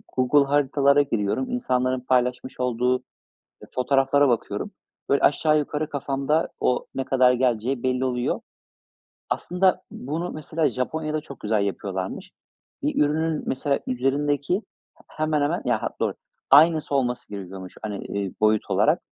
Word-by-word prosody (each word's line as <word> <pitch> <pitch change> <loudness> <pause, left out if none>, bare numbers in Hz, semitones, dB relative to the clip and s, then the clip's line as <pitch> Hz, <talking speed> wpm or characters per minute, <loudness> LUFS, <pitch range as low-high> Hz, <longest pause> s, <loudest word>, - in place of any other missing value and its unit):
Google 130 +3 +4
Haritalar'a 140 0 +3
giriyorum. 115 - -1
İnsanların 130 - 0
paylaşmış 125 0 0
olduğu 125 0 +1 0.6
e - - -10
fotoğraflara 135 +2 +3
bakıyorum. 120 -2 -2 0.4
Böyle, 140 - +3
aşağı 155 +1 +4
yukarı 150 +1 -3
kafamda 140 +2 0
o 125 - +1
ne 135 - -1
kadar 130 -1 +4
geleceği 125 0 0
belli 130 0 +1
oluyor. 125 -1 -1 0.9
Aslında 180 +1 +1
bunu, 160 +7 -4
mesela, 155 +1 -1
Japonya'da 155 +4 -2
çok 140 -4 -12
güzel 105 -1 +1
yapıyorlarmış. 95 -1 -4 0.5
Bir - - +2
ürünün, 155 +1 0
mesela, 140 +1 0
üzerindeki, 140 +5 0 0.4
h - - -22
hemen 155 -1 0
hemen, 145 - 0
ya - - 0
hat - - -5
doğru, - - 0 0.4
aynısı 155 +1 +5
olması 125 -3 -1
gerekiyormuş, 95 -2 -8
hani, 105 -2 -5
iii, 100 -2 -3
boyut 110 0 +2
olarak. - - +3
135 Hz, 135 wpm, -24 LUFS, 125-150 Hz, 0.9 s, aynısı